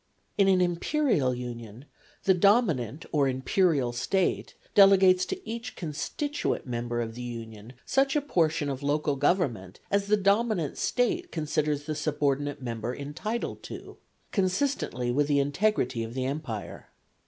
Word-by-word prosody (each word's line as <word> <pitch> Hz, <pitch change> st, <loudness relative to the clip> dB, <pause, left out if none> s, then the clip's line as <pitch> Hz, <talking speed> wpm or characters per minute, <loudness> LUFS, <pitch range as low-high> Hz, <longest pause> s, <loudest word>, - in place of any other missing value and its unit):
In 200 Hz, -1 st, +4 dB
an 190 Hz, -1 st, +4 dB
imperial 175 Hz, -, +1 dB
union 120 Hz, 0 st, -8 dB, 0.4 s
the 190 Hz, -, +5 dB
dominant 170 Hz, -, +2 dB
or 145 Hz, -3 st, +3 dB
imperial 135 Hz, 0 st, +1 dB
State 190 Hz, +9 st, -1 dB, 0.2 s
delegates 195 Hz, -2 st, +6 dB
to 380 Hz, 0 st, -6 dB
each 230 Hz, +2 st, -5 dB
constituent 240 Hz, -, -3 dB
member 120 Hz, -1 st, -2 dB
of 115 Hz, -1 st, -4 dB
the 120 Hz, -, -8 dB
union 115 Hz, -1 st, -8 dB
such 270 Hz, +1 st, +2 dB
a 295 Hz, -, +3 dB
portion 160 Hz, -, +1 dB
of 135 Hz, -1 st, -3 dB
local 145 Hz, 0 st, 0 dB
government 135 Hz, -, 0 dB
as 200 Hz, 0 st, +1 dB
the 210 Hz, +1 st, +4 dB
dominant 200 Hz, -, +1 dB
State 345 Hz, +9 st, 0 dB
considers 150 Hz, -2 st, -1 dB
the 155 Hz, +1 st, -3 dB
subordinate 145 Hz, -2 st, -1 dB
member 120 Hz, 0 st, -3 dB
entitled 165 Hz, +12 st, -4 dB
to, -, -, -9 dB, 0.3 s
consistently 185 Hz, -, 0 dB
with 145 Hz, +3 st, +1 dB
the 145 Hz, -1 st, +2 dB
integrity 140 Hz, -, +1 dB
of 115 Hz, +2 st, -7 dB
the 130 Hz, -1 st, -1 dB
empire. 130 Hz, -7 st, -5 dB
150 Hz, 140 wpm, -28 LUFS, 125-195 Hz, 0.4 s, delegates